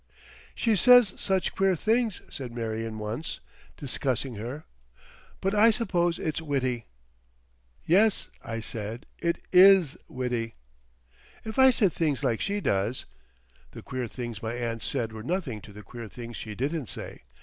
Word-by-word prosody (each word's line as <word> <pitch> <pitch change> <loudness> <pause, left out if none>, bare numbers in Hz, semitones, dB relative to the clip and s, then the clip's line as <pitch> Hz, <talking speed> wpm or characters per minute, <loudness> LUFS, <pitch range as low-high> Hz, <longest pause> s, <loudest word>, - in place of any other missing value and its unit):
"She 225 -2 +2
says 245 -1 +7
such 190 -2 0
queer 195 -1 +2
things," 225 +3 0
said 130 -3 -7
Marion 115 -1 -3
once, 110 +9 -4 0.4
discussing 130 -2 -2
her. 120 +8 -6 0.8
"But 195 +1 0
I 215 +2 +6
suppose 175 -7 +1
it's 155 0 -2
witty." 130 -6 -1 1.0
"Yes," 200 +5 +3
I 115 0 -4
said; 110 +4 -5
"it 170 0 0
is 185 -5 +7
witty." 120 -3 -3 0.9
"If 220 +3 -4
I 265 0 +9
said 210 -8 +3
things 150 -4 0
like 120 -4 +1
she 200 +1 -1
does—" 100 - 0 0.7
The - - -9
queer 125 -1 -4
things 120 -2 -6
my 115 +1 -3
aunt 115 -2 -3
said 115 -1 -2
were 110 - -7
nothing 130 - -3
to 105 - -13
the 105 +1 -11
queer 120 0 -8
things 120 +1 -8
she 110 -2 -6
didn't 140 +2 -2
say. - - -8
130 Hz, 150 wpm, -27 LUFS, 115-190 Hz, 1.0 s, I